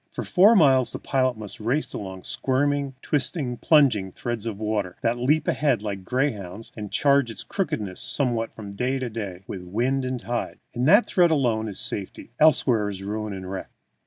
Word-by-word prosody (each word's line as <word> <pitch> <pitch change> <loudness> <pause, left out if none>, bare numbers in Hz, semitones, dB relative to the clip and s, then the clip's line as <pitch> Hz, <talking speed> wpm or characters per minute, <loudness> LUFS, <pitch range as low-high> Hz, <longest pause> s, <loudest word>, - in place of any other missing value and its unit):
For - - -5
four 200 +5 +5
miles 135 - +5
the - - -4
pilot 130 -3 0
must 105 -2 -8
race 125 +8 -1
along 95 -2 -6
a - - -26
squirming, 140 0 0
twisting, 140 -3 -1
plunging 120 - +3
thread 115 0 -4
of 110 -3 -4
water, 105 -4 -2
that 120 +1 +1
leaps 150 +5 +2
ahead 135 -8 +1
like 100 -2 -3
a - - -15
greyhound, 110 -3 -3
and 105 -2 -7
changes 140 -3 +3
its - - -5
crookedness 105 - -3
somewhat 120 -5 0
from 100 -2 -8
day 125 +6 -1
to 130 -3 -4
day 100 -5 -6
with 95 - -6
wind 120 +9 -1
and 130 -1 -2
tide. 120 +1 -3 0.2
In 125 +1 -1
that 205 - +6
thread 175 -2 +3
alone 120 -8 +1
is 100 - -4
safety; 100 +3 -5
elsewhere 125 -8 +4
is 95 -1 -6
ruin 105 +1 -3
and 95 -1 -6
wreck. 95 - -5
120 Hz, 190 wpm, -24 LUFS, 105-135 Hz, 0.2 s, that